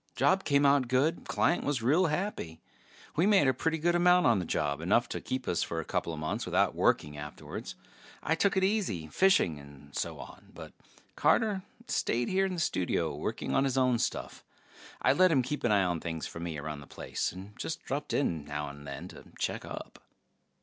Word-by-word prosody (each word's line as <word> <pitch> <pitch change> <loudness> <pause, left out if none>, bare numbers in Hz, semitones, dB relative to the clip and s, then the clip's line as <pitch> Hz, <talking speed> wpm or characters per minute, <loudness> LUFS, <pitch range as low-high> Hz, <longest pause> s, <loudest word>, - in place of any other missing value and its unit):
Job 190 +1 +3
came 140 -1 +3
out 140 -2 +4
good; 135 +7 +1
client 175 - +1
was 140 -5 -1
real 160 +9 +4
happy. 150 - -3 0.6
We 170 +5 +3
made 195 -9 +5
a 130 - +4
pretty 160 +6 -1
good 170 +2 +1
amount 180 +1 +5
on 115 -4 +4
the 90 - -3
job, 70 0 -1
enough 115 +8 +2
to - - -4
keep 130 0 -4
us 85 - +1
for 85 - -2
a 80 - -4
coupla 85 -2 -2
months 75 0 -2
without - - +2
working 75 0 +1
afterwards. 75 0 -7 0.5
I - - +1
took 195 +4 +2
it 190 - +3
easy, 190 - 0
fishing 140 - +3
and 70 0 -14
so - - -2
on, - - -11
but - - -10 0.4
Carter 210 -4 +2 0.3
stayed 120 +1 0
here 195 +1 +2
in 185 - -3
the - - -4
studio 95 - 0
working - - -3
on 135 - +3
his 135 -1 0
own 125 -2 +3
stuff. - - -3 0.6
I - - +5
let 185 0 +5
him 135 -5 +3
keep 150 +4 -4
an 120 - +2
eye 100 -2 +4
on 90 -2 0
things 80 -1 -4
for - - -7
me 85 -2 -4
around 75 0 -5
the 70 - -12
place, - - -3
and 95 +3 -10
just 160 - -4
dropped 145 +2 -3
in 85 - 0
now 75 0 -4
and 70 0 -11
then 70 -1 -6
to - - -12
check - - -2
up. - - -8
125 Hz, 205 wpm, -30 LUFS, -, 0.6 s, made